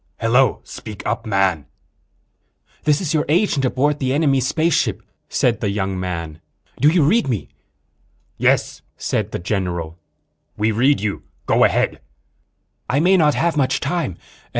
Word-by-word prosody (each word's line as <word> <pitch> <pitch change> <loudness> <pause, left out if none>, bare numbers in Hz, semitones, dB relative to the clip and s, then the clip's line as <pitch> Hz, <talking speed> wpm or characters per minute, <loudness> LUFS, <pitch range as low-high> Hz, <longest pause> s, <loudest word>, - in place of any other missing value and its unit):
"Hello. 120 +2 +2
Speak 105 -3 -9
up, 115 +1 -2
man." 95 -7 +1 1.2
"This 150 +2 +3
is 165 -4 -2
your 155 -1 +2
agent 165 -4 +2
aboard 145 +4 +1
the 130 -1 0
enemy 140 -3 +2
spaceship," 155 +6 0 0.3
said 115 -3 +1
the 105 - 0
young 95 -2 -2
man. 85 -4 -5 0.4
"Do 145 - +4
you 165 -1 +3
read 215 +11 +3
me?" 115 -7 -2 0.9
"Yes," - - +1 0.2
said - - -2
the - - -2
general. 85 -3 -3 0.6
"We 110 +1 +1
read 130 +7 +2
you. 105 -1 -2 0.2
Go - - +3
ahead." - - 0 0.9
"I 135 - +2
may 180 +5 +4
not 150 -5 +3
have 170 -1 +1
much 135 -2 +1
time. 160 - -2
130 Hz, 145 wpm, -20 LUFS, 95-150 Hz, 1.2 s, Do